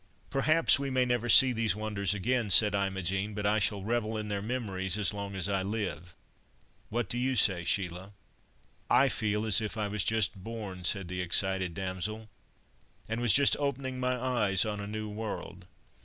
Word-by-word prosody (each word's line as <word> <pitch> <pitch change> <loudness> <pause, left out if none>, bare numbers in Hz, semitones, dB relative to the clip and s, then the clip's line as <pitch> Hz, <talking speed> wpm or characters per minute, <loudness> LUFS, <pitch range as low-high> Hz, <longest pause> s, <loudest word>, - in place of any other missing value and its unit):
"Perhaps 155 +3 +3
we 140 -1 -3
may 130 -1 +1
never 120 -1 -1
see 130 +2 +8
these 110 -4 0
wonders 105 -2 -1
again," 115 +2 -1
said 105 +2 +8
Imogen. 95 +1 -2
"But 105 -1 -4
I 105 +1 +2
shall 100 -1 0
revel 110 0 -2
in 105 -1 -5
their 100 -1 -3
memories 100 -5 -3
as 105 -2 0
long 100 -1 -6
as 95 -2 -1
I 100 -1 -1
live. 95 -5 -5 0.7
What 120 -1 -2
do 120 - -3
you 130 +1 -1
say, 95 -6 +4
Sheila?" 90 +1 -3 0.8
"I 135 +1 +4
feel 105 -2 -2
as 110 0 +2
if 110 +1 -5
I 105 -1 -1
was 100 -1 -2
just 105 -3 -1
born," 105 -5 -7
said 95 -1 +2
the 90 +1 -4
excited 95 0 -1
damsel, 100 +4 -5 0.8
"and 110 +2 -4
was 120 -3 +3
just 140 +6 +5
opening 135 -2 -3
my 125 0 -1
eyes 110 -7 +1
on 105 -1 -4
a 100 - -6
new 110 +1 -5
world. 105 -4 -7
105 Hz, 185 wpm, -29 LUFS, 95-115 Hz, 0.8 s, see